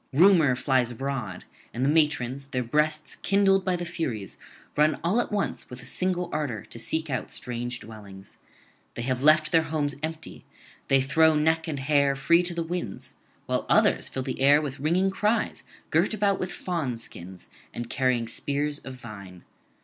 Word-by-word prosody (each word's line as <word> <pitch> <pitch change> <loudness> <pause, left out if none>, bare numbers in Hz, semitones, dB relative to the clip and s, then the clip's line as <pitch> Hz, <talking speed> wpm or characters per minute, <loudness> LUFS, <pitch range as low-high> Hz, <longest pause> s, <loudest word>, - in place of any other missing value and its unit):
Rumour 160 -3 +5
flies 125 -1 +1
abroad; 120 -6 -4 0.3
and 125 +3 0
the - - +3
matrons, 140 -4 +1
their 130 -2 -2
breasts 150 +4 0
kindled 195 -1 +3
by 185 -1 +1
the 175 0 -4
furies, 130 - -4 0.4
run 150 +1 +3
all 195 +8 +2
at - - -5
once 205 -1 -1
[393 - - -18
426]with - - -13
a - - -4
single 180 -1 -1
ardour 145 -9 -2
to 115 - -10
seek 160 +8 -2
out 130 - -3
strange 120 -1 -5
dwellings. 100 -3 -12 0.6
They 120 - -4
have 130 0 -1
left 155 +1 +5
their 165 - +5
homes 150 -2 -1
empty, 160 0 -5 0.4
they 135 -1 +4
throw 160 +3 +4
neck 160 +2 +2
and 150 -3 -3
hair 140 -1 +3
free 150 +6 +4
to 175 -1 -5
the 170 - -1
winds; 165 - -5 0.3
while - - -1
others - - +3
fill 130 - -4
the - - -4
air 145 +2 +6
with 145 -2 -5
ringing 175 +6 +2
cries, 210 +4 0 0.3
girt - - +2
about 200 -2 +1
with 185 - -2
fawnskins, 115 - -5 0.3
and 120 0 -5
carrying 125 -2 0
spears 145 +4 -2
of 135 -1 -9
vine. 100 -7 -11
145 Hz, 175 wpm, -26 LUFS, 125-165 Hz, 0.6 s, air